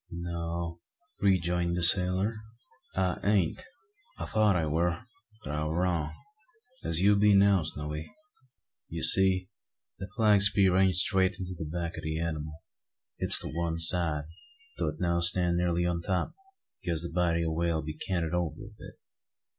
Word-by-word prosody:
"No," 85 Hz, 0 st, -5 dB, 0.4 s
rejoined 90 Hz, -3 st, 0 dB
the 90 Hz, -, 0 dB
sailor, 95 Hz, +4 st, +4 dB, 0.6 s
"I 95 Hz, -1 st, -1 dB
ain't. 100 Hz, -5 st, 0 dB, 0.5 s
I -, -, -5 dB
thought 110 Hz, -3 st, +1 dB
I 85 Hz, -3 st, 0 dB
war; 85 Hz, +6 st, -1 dB, 0.4 s
but -, -, -6 dB
I 75 Hz, 0 st, -2 dB
war 80 Hz, +3 st, -2 dB
wrong, 85 Hz, -5 st, -2 dB, 0.7 s
as 80 Hz, +1 st, +2 dB
you 100 Hz, +2 st, +4 dB
be 105 Hz, 0 st, +4 dB
now, 100 Hz, -1 st, +4 dB
Snowy. 75 Hz, -1 st, -5 dB, 0.8 s
You -, -, -6 dB
see 95 Hz, -1 st, +5 dB, 0.5 s
the 95 Hz, -, -6 dB
flag 105 Hz, -3 st, +3 dB
spear 100 Hz, -2 st, +5 dB
ain't 95 Hz, -1 st, +3 dB
straight 95 Hz, 0 st, +1 dB
into 90 Hz, 0 st, -6 dB
the 80 Hz, -, -6 dB
back 85 Hz, 0 st, -5 dB
o' -, -, -7 dB
the 80 Hz, 0 st, -4 dB
anymal. 80 Hz, -1 st, -5 dB, 0.6 s
It's -, -, +2 dB
to -, -, -6 dB
one 85 Hz, 0 st, -3 dB
side, 80 Hz, -2 st, +4 dB, 0.6 s
though -, -, -1 dB
it 75 Hz, +1 st, -5 dB
now 85 Hz, -1 st, 0 dB
stand 85 Hz, 0 st, +1 dB
nearly 85 Hz, 0 st, 0 dB
on 85 Hz, -1 st, -2 dB
top; 90 Hz, +1 st, -2 dB, 0.5 s
because 85 Hz, -1 st, -2 dB
the 85 Hz, -, -6 dB
body 85 Hz, -1 st, 0 dB
o' 80 Hz, -, -1 dB
the -, -, -4 dB
whale 80 Hz, -1 st, -1 dB
be 75 Hz, 0 st, -6 dB
canted 85 Hz, 0 st, -3 dB
over 85 Hz, -2 st, -2 dB
a 105 Hz, 0 st, -10 dB
bit. -, -, -13 dB
85 Hz, 165 wpm, -28 LUFS, 80-95 Hz, 0.8 s, see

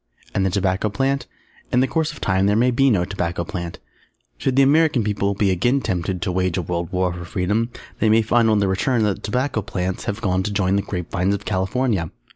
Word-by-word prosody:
And 95 Hz, -, +1 dB
the 95 Hz, -, +2 dB
Tobacco 95 Hz, +2 st, 0 dB
Plant? 135 Hz, +6 st, -1 dB, 0.4 s
In 125 Hz, -, +3 dB
the 130 Hz, -, +2 dB
course 160 Hz, +1 st, 0 dB
of -, -, -11 dB
time 95 Hz, 0 st, +1 dB
there 105 Hz, -, +3 dB
may 125 Hz, +3 st, +3 dB
be 135 Hz, +3 st, +3 dB
no 95 Hz, -7 st, +2 dB
Tobacco 85 Hz, -3 st, -2 dB
Plant. 85 Hz, -4 st, -5 dB, 0.6 s
Should 130 Hz, -, 0 dB
the 135 Hz, -, +6 dB
American 145 Hz, -3 st, +4 dB
People 100 Hz, -1 st, 0 dB
be 100 Hz, -1 st, +2 dB
again 120 Hz, +10 st, +2 dB
tempted 90 Hz, -4 st, -2 dB
to 90 Hz, -, -1 dB
wage 90 Hz, -1 st, 0 dB
a 90 Hz, -, -1 dB
World 85 Hz, +1 st, -3 dB
War 90 Hz, -1 st, 0 dB
for 90 Hz, 0 st, -7 dB
Freedom, 105 Hz, +5 st, -1 dB, 0.3 s
they 110 Hz, -, +3 dB
may 110 Hz, +1 st, +4 dB
find 115 Hz, +1 st, +3 dB
on 110 Hz, -, +3 dB
their 100 Hz, -1 st, +2 dB
return 115 Hz, +5 st, +1 dB
that 105 Hz, -2 st, +1 dB
the -, -, -16 dB
Tobacco 125 Hz, +2 st, -1 dB
Plants 95 Hz, -2 st, -3 dB
have 100 Hz, +1 st, -3 dB
gone 95 Hz, -4 st, 0 dB
to 105 Hz, -, -2 dB
join 100 Hz, -2 st, +1 dB
the 100 Hz, -, +2 dB
Grape 90 Hz, -3 st, -5 dB
Vines 95 Hz, +2 st, +1 dB
of 100 Hz, -, -8 dB
California! 95 Hz, -2 st, 0 dB
100 Hz, 235 wpm, -21 LUFS, 90-115 Hz, 0.6 s, the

